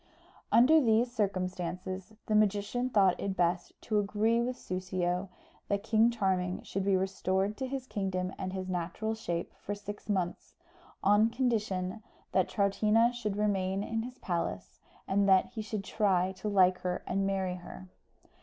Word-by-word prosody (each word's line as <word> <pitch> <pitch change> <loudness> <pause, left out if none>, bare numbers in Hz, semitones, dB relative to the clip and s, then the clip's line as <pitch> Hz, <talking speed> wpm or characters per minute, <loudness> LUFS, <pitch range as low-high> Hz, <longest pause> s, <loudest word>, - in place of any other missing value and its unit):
Under 300 +7 +6
these 235 0 +3
circumstances 185 -2 -3
the 215 - -1
magician 210 +4 +2
thought 195 -6 +3
it 195 -1 -3
best 175 0 0
to 215 -2 +1
agree 215 +3 +1
with 250 +1 -1
Soussio 185 0 -2 0.4
that 200 0 -1
King 225 +1 +4
Charming 190 -5 -1
should 195 - -3
be 195 -1 +3
restored 190 +1 0
to 265 - -3
his 265 -1 -4
kingdom 190 -5 -2
and 185 -1 -3
his 190 -1 -4
natural 180 +5 -2
shape 175 -6 -4
for 205 - -3
six 205 +1 -9
months, 185 -4 -2 0.5
on 205 +3 +5
condition 215 -5 -1 0.3
that 190 -2 +2
Troutina 215 +4 +3
should 215 -4 -3
remain 195 -2 0
in 225 +1 -2
his 250 +2 -7
palace, 170 -2 -3 0.3
and 200 +1 +2
that 190 -1 +4
he 220 - -5
should 215 -2 -4
try 190 -3 +1
to 190 +2 -6
like 185 -2 +4
her 180 0 -3
and 195 0 0
marry 190 -2 -1
her. 185 +1 -10
195 Hz, 155 wpm, -31 LUFS, 185-220 Hz, 0.5 s, Under